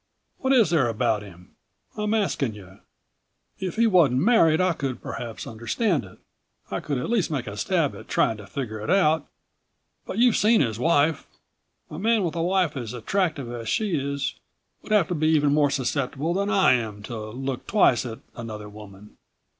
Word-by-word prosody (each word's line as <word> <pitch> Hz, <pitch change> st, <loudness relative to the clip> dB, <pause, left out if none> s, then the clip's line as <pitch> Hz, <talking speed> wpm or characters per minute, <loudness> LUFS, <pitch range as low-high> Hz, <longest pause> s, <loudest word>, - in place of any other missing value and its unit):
What 265 Hz, -, 0 dB
is 230 Hz, -, +4 dB
there 150 Hz, -7 st, +3 dB
about 115 Hz, -1 st, 0 dB
him? 90 Hz, -3 st, -14 dB, 0.4 s
I'm 210 Hz, 0 st, 0 dB
asking 140 Hz, -, 0 dB
you. 95 Hz, -1 st, -14 dB, 0.8 s
If 185 Hz, -2 st, -4 dB
he 230 Hz, +1 st, +3 dB
wasn't 160 Hz, -, +4 dB
married 165 Hz, -7 st, +4 dB
I 185 Hz, -1 st, +2 dB
could 135 Hz, -5 st, -4 dB
perhaps 115 Hz, -2 st, -6 dB
understand 120 Hz, -, -1 dB
it. 95 Hz, -, -15 dB, 0.5 s
I -, -, -1 dB
could 145 Hz, -, -3 dB
at 125 Hz, -, -3 dB
least 225 Hz, -6 st, +1 dB
make 140 Hz, -6 st, -2 dB
a 100 Hz, -, -6 dB
stab 105 Hz, -, 0 dB
at -, -, -11 dB
trying 110 Hz, -, +1 dB
to 105 Hz, -1 st, -11 dB
figure 110 Hz, 0 st, -5 dB
it 105 Hz, -, -6 dB
out. 160 Hz, -5 st, +3 dB, 0.8 s
But -, -, -5 dB
you've 240 Hz, 0 st, +4 dB
seen 220 Hz, +2 st, +4 dB
his 115 Hz, -5 st, -1 dB
wife. 155 Hz, +1 st, +2 dB, 0.6 s
A 155 Hz, -, -6 dB
man 220 Hz, +1 st, +2 dB
with 170 Hz, -, -1 dB
a 165 Hz, -, -1 dB
wife 180 Hz, -2 st, +1 dB
as 120 Hz, -4 st, -5 dB
attractive 145 Hz, -, -1 dB
as 115 Hz, -2 st, -5 dB
she 215 Hz, -3 st, 0 dB
is 140 Hz, -1 st, -2 dB, 0.5 s
would -, -, -11 dB
have 210 Hz, -6 st, +4 dB
to -, -, 0 dB
be 155 Hz, -1 st, 0 dB
even 150 Hz, -2 st, +3 dB
more 145 Hz, -1 st, +3 dB
susceptible 140 Hz, +3 st, -1 dB
than 200 Hz, +2 st, -1 dB
I 195 Hz, -10 st, +4 dB
am 110 Hz, -4 st, -3 dB
to 120 Hz, -, -6 dB
look 130 Hz, +2 st, -5 dB
twice 195 Hz, -, +3 dB
at 115 Hz, -3 st, -6 dB, 0.2 s
another 110 Hz, -3 st, -7 dB
woman. 105 Hz, -1 st, -13 dB
140 Hz, 185 wpm, -25 LUFS, 115-185 Hz, 0.8 s, is